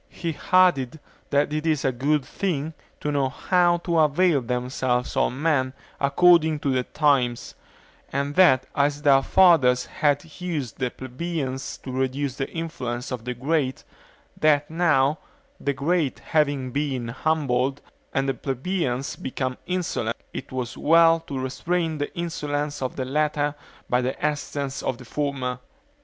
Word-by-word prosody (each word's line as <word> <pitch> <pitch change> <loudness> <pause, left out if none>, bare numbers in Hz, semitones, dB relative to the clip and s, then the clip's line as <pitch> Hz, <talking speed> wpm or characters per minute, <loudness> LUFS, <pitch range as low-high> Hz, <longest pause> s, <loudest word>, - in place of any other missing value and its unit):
He 165 -3 -4 0.2
added, 160 -7 +4 0.3
that 145 +1 +1
it 155 +1 -1
is 155 -3 +1
a 135 - +3
good 140 +3 0
thing 160 -5 -2 0.3
to 150 - -1
know 140 -2 +1
how 175 +4 +2
to 170 -3 +2
avail 155 0 +3
themselves 125 0 -1
of - - +2
men 130 -1 0 0.3
according 160 +2 +4
to 140 - 0
the 130 - +2
times; 125 -3 +1 0.6
and 140 +1 -1
that 140 -7 +5
as 145 +1 +1
their 135 -2 +6
fathers 140 -8 +5
had 145 +3 -1
used 155 -10 -3
the 130 -2 0
plebeians 135 +1 -4
to 130 - -6
reduce 130 +1 -2
the 135 - -2
influence 130 -8 -4
of 120 -3 -5
the 125 0 -3
great, 135 +1 -1 0.6
that 150 -1 +3
now, 155 -4 +2 0.4
the 140 - -1
great 145 +1 0
having 145 -4 0
been 135 -4 -2
humbled, 135 -1 0 0.3
and 135 0 0
the 135 - +1
plebeians 135 +1 -2
become 130 -1 -3
insolent, 170 -11 -2 0.2
it - - -7
was 130 -1 -4
well 165 +1 +5
to 140 - -4
restrain 160 +5 -2
the 145 - -2
insolence 150 -4 -3
of 130 - -3
the 130 - -3
latter 150 +1 0 0.3
by 125 0 +2
the 130 +1 -2
assistance 145 -2 -2
of 125 - -2
the 125 - -12
former. 130 -2 -2
140 Hz, 150 wpm, -24 LUFS, 130-160 Hz, 0.6 s, their